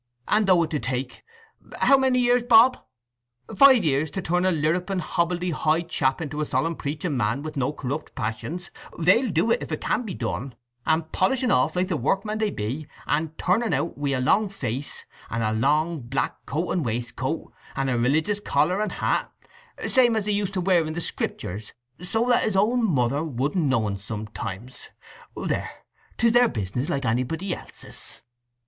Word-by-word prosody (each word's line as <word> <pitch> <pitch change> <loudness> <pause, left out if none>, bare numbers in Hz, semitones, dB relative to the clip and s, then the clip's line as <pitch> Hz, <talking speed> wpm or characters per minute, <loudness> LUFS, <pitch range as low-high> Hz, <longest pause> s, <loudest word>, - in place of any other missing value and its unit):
And 210 -1 +3
though 180 -3 +5
it 160 - -4
do 150 - 0
take—how 275 - -1
many 265 -1 +3
years, 245 0 +3
Bob?—five 180 - +3
years 150 +1 +1
to 190 - -4
turn 180 +2 +1
a - - +3
lirruping 175 +5 0
hobble 170 +1 0
de 180 0 -2
hoy 160 +1 +1
chap 135 -5 0
into 150 -1 -4
a - - 0
solemn 165 +2 0
preaching 150 +2 -3
man 120 +3 0
with 155 0 -6
no 135 0 0
corrupt 145 +1 -5
passions, 150 - -4 0.3
they'll 195 +9 +4
do 180 +6 +1
it, 240 - +2
if - - -6
it - - -2
can - - 0
be 220 -5 -5
done, 120 +3 -4 0.3
and 160 0 +1
polish 255 +8 +1
un 245 - +2
off 135 +6 +2
like 180 +1 +1
the 180 -5 -1
workmen 210 - -1
they 215 -1 +1
be, 135 - -4 0.2
and 155 +1 -1
turn 185 +6 +2
un 225 -7 -1
out 150 +5 -1
wi' 145 0 -2
a 135 -2 0
long 200 +11 +3
face, 140 - -4 0.2
and 115 0 -2
a 110 - +1
long 150 +8 +1
black 125 +3 -3
coat 160 +6 -2
and 175 - 0
waistcoat, 120 0 -3 0.2
and 135 - -1
a 130 - +1
religious 155 - +1
collar 195 -1 +1
and 215 - -2
hat, - - 0 0.6
same 245 -3 +4
as 215 -2 0
they 210 - 0
used 200 -1 -1
to 185 - 0
wear 180 -2 +3
in 155 0 -4
the 170 - -3
Scriptures, 105 - -4 0.3
so 225 +6 0
that 245 - +4
his 215 - 0
own 230 +5 +3
mother 140 - +1
wouldn't 150 +3 -1
know 125 -5 +2
un 100 -1 -3
sometimes.… 105 +2 -6 0.5
There, - - -2 0.5
'tis 230 0 +4
their 240 0 +5
business, 110 +6 -3
like 140 -1 -1
anybody 135 - -1
else's." - - -8
160 Hz, 185 wpm, -25 LUFS, 130-200 Hz, 0.6 s, though